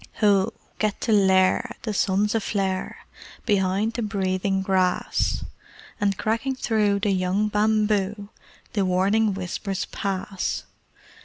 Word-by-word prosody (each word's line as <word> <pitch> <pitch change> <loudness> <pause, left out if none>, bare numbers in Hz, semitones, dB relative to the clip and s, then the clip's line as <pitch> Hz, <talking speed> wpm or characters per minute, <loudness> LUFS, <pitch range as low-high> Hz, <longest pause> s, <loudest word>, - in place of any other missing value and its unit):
Ho! 200 -3 +3 0.3
Get 215 -1 0
to 230 - 0
lair! 190 -2 +3
The 215 - -2
sun's 200 +1 +1
aflare 195 -4 -1 0.5
Behind 200 +1 +1
the 235 - -3
breathing 195 -2 -1
grass: 185 -1 +1 0.5
And 200 -1 +1
cracking 230 +5 -1
through 210 -5 +1
the 205 - +1
young 190 +3 +1
bamboo 210 -1 +1 0.4
The 205 - +1
warning 195 +3 +2
whispers 190 +1 -3
pass. 195 -1 -3
200 Hz, 110 wpm, -24 LUFS, 190-215 Hz, 0.5 s, Ho